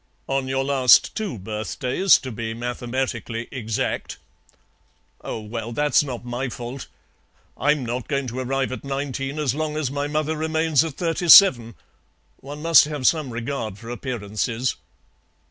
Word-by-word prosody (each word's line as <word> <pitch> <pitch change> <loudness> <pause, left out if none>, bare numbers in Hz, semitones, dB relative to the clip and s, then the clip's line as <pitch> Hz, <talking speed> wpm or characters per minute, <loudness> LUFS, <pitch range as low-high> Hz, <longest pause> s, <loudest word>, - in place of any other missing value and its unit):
"On 135 -1 -1
your 135 0 0
last 135 -3 +4
two 210 - -3
birthdays, 110 - +1
to 130 - -6
be 115 0 -5
mathematically 120 -1 -4
exact." 115 -5 -3 1.1
"Oh, - - -4
well, 115 +2 -6
that's 145 +2 +3
not 125 -4 -6
my 125 +2 -3
fault. 120 +2 -7 0.7
I'm 145 -2 +1
not 120 +1 -4
going 140 -2 -1
to 125 +1 -5
arrive 130 +1 -1
at 130 - -6
nineteen 135 0 -4
as 145 -5 0
long 155 +1 -3
as 145 -4 -2
my 145 +1 -2
mother 155 +1 -1
remains 160 -1 +1
at 160 -4 -5
thirty 170 0 -2
seven. 120 - +8 0.6
One 145 +2 -9
must 165 -2 +7
have 150 -3 -5
some 155 -3 +2
regard 115 -3 -4
for 115 +3 -9
appearances." 120 0 -3
130 Hz, 145 wpm, -23 LUFS, 120-150 Hz, 1.1 s, seven